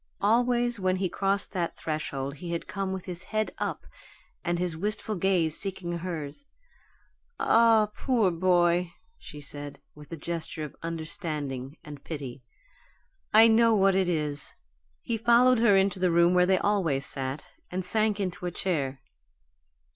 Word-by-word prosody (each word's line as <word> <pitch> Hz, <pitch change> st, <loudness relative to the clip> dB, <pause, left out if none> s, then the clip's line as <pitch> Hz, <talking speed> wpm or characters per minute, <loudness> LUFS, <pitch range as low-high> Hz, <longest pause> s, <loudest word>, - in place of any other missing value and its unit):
Always 240 Hz, +2 st, +2 dB
when 185 Hz, -1 st, +1 dB
he 185 Hz, -1 st, -1 dB
crossed 195 Hz, +2 st, -1 dB
that 175 Hz, -3 st, -2 dB
threshold 140 Hz, -3 st, -4 dB
he 170 Hz, +3 st, -5 dB
had 170 Hz, -, -3 dB
come 195 Hz, -1 st, -3 dB
with 190 Hz, -1 st, -5 dB
his 180 Hz, -1 st, -6 dB
head 215 Hz, 0 st, -1 dB
up -, -, -3 dB, 0.6 s
and 175 Hz, 0 st, 0 dB
his 175 Hz, -2 st, -1 dB
wistful 210 Hz, +5 st, -1 dB
gaze 175 Hz, -4 st, +1 dB
seeking 180 Hz, -3 st, -3 dB
hers. 160 Hz, -, -5 dB, 1.0 s
"Ah, 225 Hz, -2 st, +5 dB
poor 230 Hz, -8 st, +1 dB
boy!" 175 Hz, 0 st, +2 dB, 0.3 s
she 150 Hz, -, -10 dB
said, 145 Hz, 0 st, -7 dB
with 150 Hz, -1 st, -14 dB
a 165 Hz, -, -5 dB
gesture 165 Hz, 0 st, -4 dB
of 150 Hz, -, -7 dB
understanding 155 Hz, -4 st, -3 dB
and 145 Hz, -1 st, -10 dB
pity. 135 Hz, -5 st, -6 dB, 0.9 s
"I 220 Hz, +1 st, +8 dB
know 230 Hz, 0 st, +5 dB
what 195 Hz, -1 st, +4 dB
it 190 Hz, -1 st, +2 dB
is!" 150 Hz, -4 st, -2 dB, 0.5 s
He 230 Hz, -, -2 dB
followed 240 Hz, +2 st, +5 dB
her 215 Hz, -4 st, +5 dB
into 195 Hz, -1 st, +1 dB
the 180 Hz, 0 st, +2 dB
room 170 Hz, +1 st, +4 dB
where 180 Hz, 0 st, +4 dB
they 190 Hz, 0 st, +4 dB
always 175 Hz, -10 st, 0 dB
sat, 135 Hz, +1 st, -3 dB, 0.2 s
and 185 Hz, 0 st, -3 dB
sank 215 Hz, +1 st, +1 dB
into 185 Hz, -2 st, -3 dB
a -, -, -3 dB
chair. 140 Hz, -8 st, -2 dB
180 Hz, 155 wpm, -27 LUFS, 155-200 Hz, 1.0 s, I